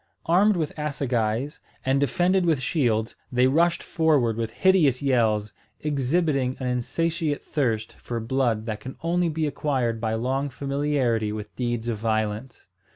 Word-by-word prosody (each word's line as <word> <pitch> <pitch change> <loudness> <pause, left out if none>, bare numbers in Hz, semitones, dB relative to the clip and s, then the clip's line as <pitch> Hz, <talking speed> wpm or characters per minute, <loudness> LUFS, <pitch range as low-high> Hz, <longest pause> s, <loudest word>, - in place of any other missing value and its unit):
Armed 190 +4 +4
with 155 -3 -2
assegais, 130 -2 -1 0.3
and 135 +1 +2
defended 180 +6 +2
with 160 -5 +2
shields, 120 -6 0 0.2
they 125 0 +3
rushed 170 +6 +2
forward 150 -9 +2
with 115 0 -2
hideous 155 - +3
yells, 110 -6 +1 0.3
exhibiting 140 -2 0
an 130 - -4
insatiate 155 +5 -1
thirst 115 -7 -1
for 120 -1 -4
blood 115 -2 0
that 110 -2 -3
can 130 +5 -8
only 175 +1 +1
be 160 0 -1
acquired 130 -6 -1
by 110 -1 0
long 135 +5 -1
familiarity 135 -5 0
with 105 0 -7
deeds 120 -2 -2
of 115 -3 -2
violence. 110 +2 -2
130 Hz, 145 wpm, -25 LUFS, 115-150 Hz, 0.3 s, Armed